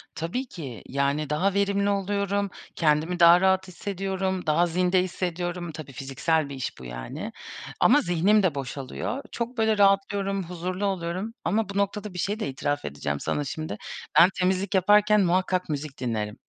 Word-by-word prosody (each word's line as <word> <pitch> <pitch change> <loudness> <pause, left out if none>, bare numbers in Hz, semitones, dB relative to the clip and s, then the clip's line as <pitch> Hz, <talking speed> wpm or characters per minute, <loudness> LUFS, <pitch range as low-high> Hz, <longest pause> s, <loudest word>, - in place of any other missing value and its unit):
Tabii 175 +12 -3
ki, 135 - -8
yani, 140 +2 0
daha 180 +6 +1
verimli 200 0 +1
oluyorum, 200 0 0 0.3
kendimi 160 +2 +1
daha 170 +1 +8
rahat 190 0 +3
hissediyorum, 190 0 -3
daha 170 +3 +3
zinde 180 +2 +2
hissediyorum. 175 -1 -3
Tabii 155 -3 -9
fiziksel 140 +4 -1
bir 140 - -6
iş 130 - -5
bu 65 - -10
yani. - - -6 0.5
Ama 290 +5 +6
zihnim 195 - +3
de 170 -6 +2
boşalıyor. 140 - -4
Çok, 240 +1 -4
böyle, 220 -1 +2
rahatlıyorum, 195 0 +2
huzurlu 180 +3 -4
oluyorum. 190 +3 -2
Ama 210 +6 0
bu 200 - -4
noktada 200 0 -1
bir 180 - -6
şeyi 205 +5 -1
de - - -2
itiraf 145 +2 -2
edeceğim 70 0 -3
sana 145 - -1
şimdi. 155 +3 -5 0.4
Ben 175 - +8
temizlik 185 +2 +1
yaparken 210 +3 +5
muhakkak 185 0 +1
müzik 145 -2 -4
dinlerim. 110 -4 -2
180 Hz, 160 wpm, -26 LUFS, 155-200 Hz, 0.5 s, daha